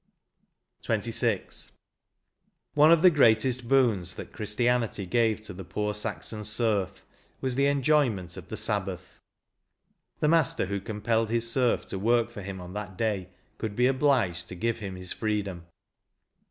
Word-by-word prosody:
E - - -49
2 - - -17
62 - - -1 0.2
XXVI. - - -8 0.5
" - - -50
One 150 +2 +6
of 170 0 +5
the 185 - +8
greatest 125 -3 +3
boons 110 -10 +2
that - - -9
Christianity 115 -1 0
gave 110 +3 +1
to 110 - -8
the 95 +1 -8
poor 105 +4 -2
Saxon 105 0 -4
serf 105 -3 0 0.3
was 130 -1 -1
the 140 +2 +2
enjoyment 135 - +1
of - - -10
the - - -4
Sabbath. - - -2 1.0
The 150 - +2
master 160 -8 +3
who 100 +1 -3
compelled 110 +2 -1
his 115 0 +1
serf 125 -1 +2
to 95 - -4
work 115 +3 +2
for 100 - -8
him 95 0 -6
on 90 0 -9
that 100 -2 -6
day 100 -4 -1 0.3
could 110 -2 -4
be 125 - +3
obliged 130 -11 +1
to - - -8
give 115 +5 -1
him 100 -3 -6
his 90 0 0
freedom." 100 -6 -3
110 Hz, 165 wpm, -27 LUFS, 100-125 Hz, 1.0 s, the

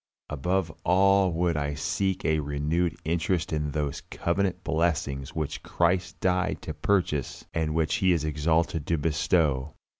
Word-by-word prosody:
Above 85 +4 0
all 95 +1 +4
would 85 0 +1
I 70 -1 -1
seek 95 +5 -1
a 80 0 +2
renewed 75 +4 -1
interest 85 0 0
in 75 -1 -1
those 75 -1 -2
covenant 90 +1 -1
blessings 80 -4 -1
which 80 -3 -3
Christ 90 0 0
died 90 0 +1
to 80 - -4
purchase 75 -3 -1
and 80 -1 -1
which 80 -2 +1
He 95 -1 +3
is 80 -3 +1
exalted 80 +1 0
to 85 - +1
bestow. 75 -2 +1
80 Hz, 145 wpm, -27 LUFS, 75-90 Hz, -, all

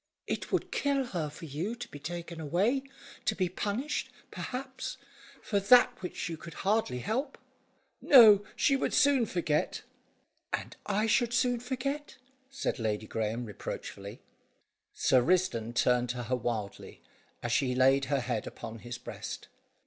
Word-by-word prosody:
"It - - -3
would - - 0
kill 280 -2 +1
her 170 -9 -3
for 150 +3 -10
you 165 +10 -3
to 245 0 -7
be 145 - -9
taken 170 +2 -6
away, 195 - +1 0.4
to 215 - +1
be 185 -3 +1
punished, 210 +10 -2 0.2
perhaps, 260 +1 -5 0.5
for 205 - +1
that 245 +5 +6
which 180 - -4
you 165 -1 -4
could 165 0 -10
hardly 205 - +2
help." 255 - -2 0.6
"No, 215 -7 +8
she 275 - +3
would 270 - 0
soon 275 -5 +4
forget." 160 -5 -1 0.7
"And - - -3
I 210 +2 +1
should 240 +1 +2
soon 245 -1 +2
forget?" 270 +4 -3 0.3
said 270 - -2
Lady 110 -1 -1
Graeme 110 +2 -2
reproachfully. 100 0 -7 0.7
Sir 130 - +3
Risdon 170 -8 +1
turned 125 0 +3
to 125 0 -3
her 125 +3 0
wildly, 115 -4 -4 0.4
as 120 - -2
she 125 +1 +2
laid 135 +1 +4
her 140 -1 0
head 120 -3 -2
upon 115 0 -8
his 120 +1 -6
breast. 120 - -7
175 Hz, 150 wpm, -30 LUFS, -, 0.7 s, No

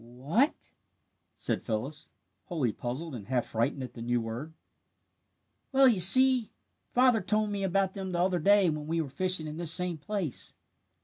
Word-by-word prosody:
"Wh 125 +5 -13
a 240 - +6
a - - -5
t - - -19 0.3
?" - - -47 0.3
said - - -1
Phyllis, 125 +7 -5 0.4
wholly 145 -10 -2
puzzled 135 +9 -6
and 110 -6 -9
half 125 -2 -1
frightened 115 +4 -2
at 125 - -9
the 115 - -10
new 120 +1 -1
word. 120 +8 -7 1.2
"Well, 270 0 +5
you 225 -7 +2
see 255 +5 +7 0.4
father 250 -3 +3
told 215 0 -1
me 200 -1 -3
about 195 0 0
them 190 -2 -6
the 175 - -3
other 180 0 +1
day 200 +2 +4
when 150 -1 -6
we 165 +1 -1
were 155 -4 -3
fishing 185 +2 0
in 155 0 -7
this 170 -2 -1
same 180 -2 +1
place. 190 - -2
170 Hz, 190 wpm, -28 LUFS, 130-200 Hz, 1.2 s, see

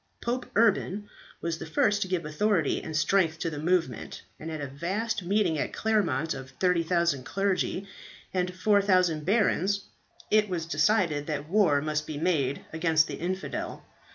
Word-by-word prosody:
Pope 245 +2 -2
Urban 205 -2 +2 0.3
was 165 -1 -2
the - - -6
first 205 +6 +2
to 190 - 0
give 180 -4 -1
authority 165 +1 +1
and 160 -1 -4
strength 160 0 +2
to 165 - -2
the 150 - -5
movement, 170 +2 -1 0.2
and 160 - -6
at 160 -1 -4
a 145 - -3
vast 190 - -2
meeting 180 -3 +1
at - - -2
Claremont 205 -7 +1
of 135 -1 -8
30,000 170 -5 +2
clergy 195 +2 -1 0.5
and 180 -1 0
4000 185 -4 +2
barons, 200 -1 +2 0.5
it 215 -1 +4
was 170 -3 -2
decided 165 -2 +1
that 150 -1 -3
war 175 -6 +3
must 150 0 -2
be 155 - -5
made 145 -5 0
against 160 -1 +3
the - - -6
infidel. 185 +3 -4
175 Hz, 155 wpm, -28 LUFS, 155-200 Hz, 0.5 s, it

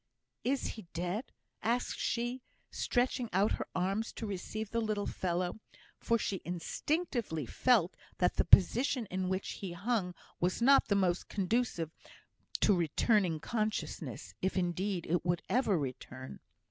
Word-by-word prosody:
"Is 270 +2 0
he 220 -6 -8
dead?" 180 +8 -2 0.4
asked 240 +3 0
she, 240 +2 -1 0.3
stretching 245 -1 0
out 195 +3 +3
her - - -2
arms 195 +5 0
to 225 - -5
receive 210 +2 -4
the 230 - +1
little 215 -2 -1
fellow; 180 +2 -1 0.4
for 230 - +2
she 200 -4 -2
instinctively 190 - -2
felt 210 - +3 0.2
that 180 - +2
the - - +4
position 240 +6 +5
in 185 0 -1
which 190 +1 -2
he 190 -3 -4
hung 185 -1 -1 0.2
was 180 +1 +1
not 275 +4 +6
the 200 - +2
most 180 -3 +1
conducive 195 -5 0 0.7
to 205 - +5
returning 175 +1 +2
consciousness, 215 +4 -3
if, 190 +1 0
indeed, 180 +1 0
it 175 +2 +1
would 175 0 0
ever 215 -3 +2
return. 130 -2 -6
195 Hz, 140 wpm, -33 LUFS, 175-230 Hz, 0.7 s, not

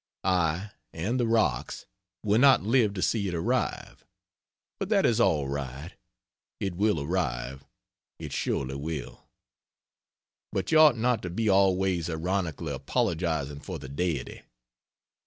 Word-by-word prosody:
I 90 +1 +1 0.2
(and 105 +10 -2
the 120 - +1
rocks) 115 -1 0 0.4
will 105 +1 +3
not 135 -4 +6
live 110 -2 +2
to 95 - -2
see 105 -4 +1
it 90 - -3
arrive, 80 - -2 0.8
but - - -3
that - - +3
is - - +2
all 75 -3 +2
right 70 +3 -5 0.7
it 95 -2 -2
will 100 -1 +1
arrive, 70 -5 -2 0.5
it - - -7
surely 65 0 -1
will. 70 -4 -6 1.3
But 95 - -2
you 160 - +6
ought 150 -6 +7
not 120 -1 +1
to 90 - -5
be 110 +5 -1
always 95 -3 +2
ironically 85 -1 -2
apologizing 80 -4 -1
for 90 +3 -6
the 70 -3 -9
Deity. 80 +1 -3
90 Hz, 135 wpm, -27 LUFS, 75-105 Hz, 1.3 s, ought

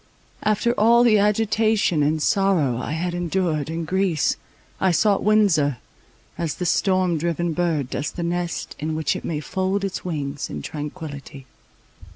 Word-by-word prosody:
After 215 +3 +1
all 235 +3 +6
the 220 -3 +5
agitation 210 -4 +2
and 155 +2 +1
sorrow 185 - +2
I 145 - -4
had 175 +2 -2
endured 175 -3 -1
in 165 0 -3
Greece, 185 -3 +1 0.4
I 190 - +3
sought 200 +3 +3
Windsor, 185 - +3 0.6
as 165 -3 -2
the 180 - -4
storm 185 -2 +2
driven 170 +1 -1
bird 160 -6 -1
does 145 - -2
the 170 - -5
nest 175 0 -3
in 155 +1 -2
which 160 0 0
it - - -6
may 155 -3 -2
fold 190 +4 -1
its 195 - -4
wings 145 -5 -4
in 75 -1 -6
tranquillity. 145 -3 -7
175 Hz, 155 wpm, -23 LUFS, 150-195 Hz, 0.6 s, all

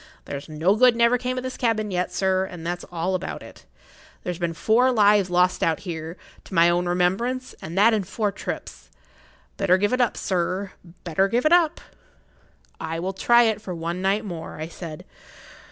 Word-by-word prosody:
There's 140 +2 -7
no 160 +6 +2
good 245 +1 +5
never 235 +1 +3
came 255 +1 -3
o' - - -1
this 255 0 -6
cabin 215 -4 0
yet, 180 0 -1
sir, 190 -1 +1
and 175 -3 -9
that's 175 +1 -3
all 175 +2 -2
about 185 0 -4
it. - - -15 0.6
There's 180 -1 -4
been 170 -1 -2
four 230 +9 +3
lives 205 -4 +4
lost 180 +1 +2
out 165 -1 +2
o' - - -15
here 165 -1 -6 0.3
to 190 - -9
my 170 0 +6
own 175 +1 0
remembrance, 195 +9 0
and 165 +4 -7
that 220 +3 +6
in 210 -2 +1
four 205 +3 -2
trips. - - -7 0.7
Better 190 -2 +3
give 205 +4 0
it 255 - +2
up, 240 - +1
sir—better 180 -1 -2
give 240 +6 0
it 310 - +5
up!" 340 -3 +3 1.0
"I 165 0 -4
will 185 +3 -3
try 240 +5 +4
it 220 -2 0
for 185 -4 -6
one 170 +2 -4
night 195 +3 +1
more," 170 -5 -7
I 160 +1 -5
said. 165 -3 -9
190 Hz, 190 wpm, -24 LUFS, 175-220 Hz, 1.0 s, my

